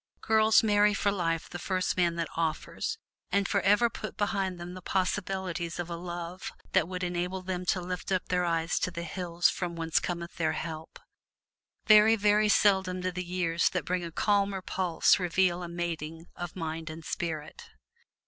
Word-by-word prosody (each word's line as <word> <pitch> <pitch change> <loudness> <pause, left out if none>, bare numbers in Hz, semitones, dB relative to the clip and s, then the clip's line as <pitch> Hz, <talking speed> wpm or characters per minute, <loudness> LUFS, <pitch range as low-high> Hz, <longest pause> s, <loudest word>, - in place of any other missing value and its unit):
Girls 220 0 +5
marry 210 -1 +4
for 200 0 +1
life 165 -4 -1
the 175 - -7
first 185 0 -1
man 175 -2 +2
that 170 -1 -2
offers, 165 - -2 0.3
and 200 0 +2
forever 205 +3 +3
put 215 -1 -7
behind 195 -3 -1
them 175 +1 -7
the 185 - -8
possibilities 185 -2 -2
of 175 -1 -4
a - - -2
love 175 +1 -6 0.2
that 165 - +3
would 180 0 -4
enable 180 +1 -2
them 180 -1 -4
to 185 - +2
lift 180 +1 -5
up 185 -1 0
their 180 -1 +2
eyes 165 -1 0
to - - 0
the 170 -1 -5
hills 175 0 0
from 175 -2 -2
whence 165 -1 +1
cometh 170 -1 -5
their 160 -2 +1
help. 160 0 -6 0.9
Very, 215 0 +7
very 210 0 +3
seldom 190 -3 +3
do 185 0 -1
the 180 +1 -4
years 175 -2 +1
that 180 - -3
bring 180 0 -1
a 170 - -5
calmer 200 +1 +1
pulse 180 -1 +2
reveal 180 0 +1
a 175 - -5
mating 165 -2 -4
of 175 -2 -6
mind 160 -2 -4
and 160 0 -8
spirit. 165 - -4
180 Hz, 175 wpm, -29 LUFS, 170-195 Hz, 0.9 s, Very